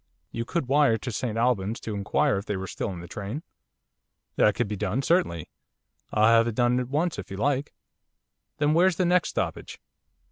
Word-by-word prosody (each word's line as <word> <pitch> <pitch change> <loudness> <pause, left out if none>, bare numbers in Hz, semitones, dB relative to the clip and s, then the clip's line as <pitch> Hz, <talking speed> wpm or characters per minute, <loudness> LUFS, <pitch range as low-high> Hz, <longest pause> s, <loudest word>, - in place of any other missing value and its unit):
'You 115 0 -4
could 155 0 -2
wire 140 -4 +4
to 125 +3 -5
St 115 0 -3
Albans 115 -3 +1
to 110 - -5
inquire 100 0 +1
if 100 - -10
they 105 - -1
were 95 - -4
still 95 - -4
in 90 -3 -6
the 85 - -9
train?' 105 - -6 0.9
'That 105 - +4
could 120 - 0
be 105 - -3
done, 105 +6 -1
certainly. 130 - +1 0.6
I'll 110 0 +3
have 115 0 +3
it 115 - -3
done 120 +1 +2
at 125 -1 -4
once 155 - 0
if 95 - -8
you 95 - -6
like.' 140 +4 0 0.9
'Then 150 +1 +2
where's 180 +2 +4
the 185 - +1
next 180 -1 +3
stoppage? - - -4
115 Hz, 200 wpm, -26 LUFS, 105-145 Hz, 0.9 s, wire